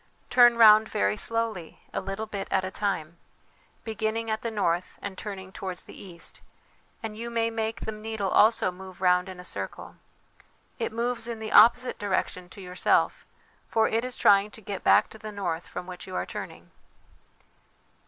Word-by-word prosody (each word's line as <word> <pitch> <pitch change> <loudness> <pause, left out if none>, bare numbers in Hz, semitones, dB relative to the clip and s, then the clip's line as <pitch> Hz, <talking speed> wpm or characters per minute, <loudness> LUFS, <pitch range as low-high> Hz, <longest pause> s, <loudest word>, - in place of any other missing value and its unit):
Turn 240 -1 +7
round 215 -1 +7
very 100 +1 +1
slowly, 225 - -1
a - - -1
little 195 +3 -4
bit 200 -2 -5
at 190 -1 +1
a 185 - -5
time, 180 -5 -2 0.7
beginning 220 +1 -2
at 220 - -2
the 230 - -2
north 180 -5 -1
and 200 -1 -6
turning 190 -2 -7
towards 185 -2 -6
the - - -13
east, 175 -3 -7 0.6
and 220 -1 -5
you 235 +2 -5
may 230 -1 0
make 225 0 -3
the 220 - -3
needle 215 -2 -4
also 220 -3 +4
move 185 0 -11
round 180 0 +3
in 185 -1 -9
a 180 - -9
circle. - - -7 0.8
It - - -1
moves 235 0 -2
in 235 -1 -4
the 220 -1 -6
opposite 245 +2 +6
direction 190 -3 -2
to 200 - -11
yourself, 180 -1 +1 0.4
for 225 -1 +3
it 225 +1 0
is 255 0 -2
trying 200 0 +5
to 220 - -12
get 200 -1 -6
back - - +5
to 220 - -11
the 215 0 -7
north 175 -5 -3
from 180 - -6
which 180 0 -9
you 185 - -7
are - - -1
turning." - - -8
205 Hz, 180 wpm, -27 LUFS, 185-225 Hz, 0.8 s, Turn